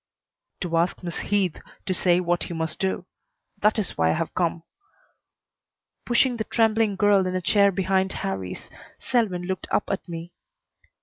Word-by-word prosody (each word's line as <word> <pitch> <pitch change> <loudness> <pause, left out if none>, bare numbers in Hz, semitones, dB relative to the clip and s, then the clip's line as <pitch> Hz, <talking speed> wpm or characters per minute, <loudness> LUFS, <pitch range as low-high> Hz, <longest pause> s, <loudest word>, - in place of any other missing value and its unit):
"To 170 -3 0
ask 175 +2 0
Miss 170 -1 -4
Heath 195 -5 0 0.2
to 190 - 0
say 180 -1 +3
what 175 -1 0
he 170 - -6
must 160 -1 -3
do. 190 -1 -1 0.6
That 210 +2 +3
is 210 -5 -2
why 80 0 +4
I - - +3
have 165 - -2
come." 170 -2 0 1.4
Pushing 245 0 +3
the 220 - -1
trembling 220 -2 +2
girl 195 -1 +4
in 185 - -2
a - - +1
chair 200 +3 +4
behind 190 0 +1
Harrie's, 95 -1 -4 0.3
Selwyn 220 -9 0
looked 185 0 -3
up - - 0
at 195 -2 -4
me. 170 +1 -6
185 Hz, 165 wpm, -25 LUFS, 170-205 Hz, 1.4 s, why